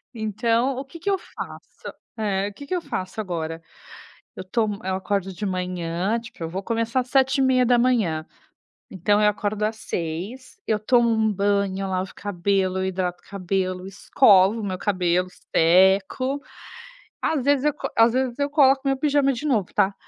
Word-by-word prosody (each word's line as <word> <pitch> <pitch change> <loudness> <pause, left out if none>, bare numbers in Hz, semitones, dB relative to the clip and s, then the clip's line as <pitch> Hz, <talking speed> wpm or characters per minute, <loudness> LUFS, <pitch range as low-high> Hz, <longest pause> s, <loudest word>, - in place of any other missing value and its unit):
Então, 230 +4 0
o 265 - -3
que 300 +5 -12
que 400 - -2
eu 390 - +2
faço - - -10 0.2
eh, 200 -2 -1
o - - -14
que 285 - -10
que 370 - -1
eu 355 - -1
faço 190 - -4
agora, 165 -4 -4 0.7
eu - - -6
tomo 210 +1 -1
eu 190 0 -1
acordo 190 0 -2
de 195 - -8
manhã, 180 +2 -2
tipo, 225 -7 -10
eu 165 - -3
vou 185 +3 -4
começar 230 +3 -1
às 250 - -10
7h30, 250 - +2 0.7
então 205 +3 +1
eu 210 - +5
acordo 210 0 -1
às 215 +1 -1
6h, 195 +8 -5
eu 215 - +2
tomo 235 +2 +3
um 220 -1 +2
banho, 200 -1 0
eu - - -3
lavo 185 0 -2
o - - -36
cabelo, 190 -1 -1
eu 190 - -1
hidrato 180 -2 -2
o - - -23
cabelo, 185 -1 -2
eu - - -9
escovo 200 +1 +4
o - - -4
meu 185 -2 -3
cabelo, 180 -2 0 0.3
seco. 190 +10 +3 0.8
Às 310 -4 0
vezes 285 -1 +2
eu 300 - +2
co - - -4
às 230 0 +5
vezes 255 -1 -1
eu 285 0 0
coloco 275 -3 +5
meu 270 0 +2
pijama 280 0 +2
de 250 +5 -5
novo, 220 -10 0
tá. 195 +1 +2
205 Hz, 180 wpm, -23 LUFS, 185-250 Hz, 0.8 s, eu